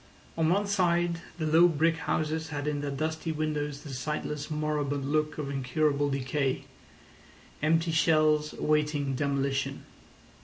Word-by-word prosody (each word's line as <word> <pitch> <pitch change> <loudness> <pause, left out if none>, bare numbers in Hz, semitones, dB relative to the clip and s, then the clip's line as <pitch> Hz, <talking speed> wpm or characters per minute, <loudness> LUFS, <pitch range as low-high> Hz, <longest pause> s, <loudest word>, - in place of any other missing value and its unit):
On 160 -1 +2
one 200 +4 +2
side 175 -4 +1 0.2
the 160 - -2
low 165 +3 +6
brick 165 0 +2
houses 160 0 -1
had 145 -1 -4
in 145 -1 -1
their 145 - -2
dusty 155 +3 -2
windows 150 -2 -2
the 145 - -7
sightless, 150 +2 -3
moribund 145 -2 -1
look 155 0 0
of 145 -2 -3
incurable 140 +2 +1
decay—empty 145 +4 -3
shells 155 -1 +3
awaiting 150 -2 0
demolition. 135 0 -1
150 Hz, 125 wpm, -29 LUFS, 140-160 Hz, 0.2 s, low